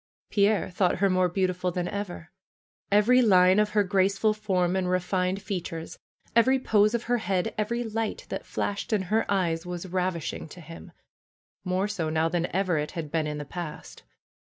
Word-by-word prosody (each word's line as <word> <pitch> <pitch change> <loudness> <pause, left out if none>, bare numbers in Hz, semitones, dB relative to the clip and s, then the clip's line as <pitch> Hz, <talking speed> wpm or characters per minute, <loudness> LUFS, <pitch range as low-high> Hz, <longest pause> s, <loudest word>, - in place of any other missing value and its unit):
Pierre 205 -1 +2
thought 180 0 +2
her 195 0 +2
more 185 -1 +2
beautiful 185 0 0
than 180 0 -2
ever. 180 -5 -6 0.6
Every 220 +5 +5
line 185 -3 +5
of 210 0 +2
her 205 - +6
graceful 195 +2 +2
form 185 -4 0
and 185 -1 0
refined 185 +1 0
features, 175 -4 -5 0.4
every 260 +3 +5
pose 215 -3 +3
of 235 - -2
her 245 0 0
head, 185 -3 -1
every 235 +3 -1
light 225 - -3
that - - -4
flashed 205 +2 -3
in 205 -3 +1
her 225 -1 +1
eyes 170 -4 +1
was 175 0 -6
rav 185 0 -1
ishing 165 0 -5
to 180 - -11
him, 165 0 -11 0.7
more 185 +2 0
so 180 -7 -2
now 160 +1 +1
than 175 0 0
ever 185 -4 0
it 150 - -4
had 160 -5 -5
been 160 -2 0
in 150 0 -3
the 145 - -5
past. 165 +1 -7
185 Hz, 180 wpm, -27 LUFS, 175-205 Hz, 0.7 s, her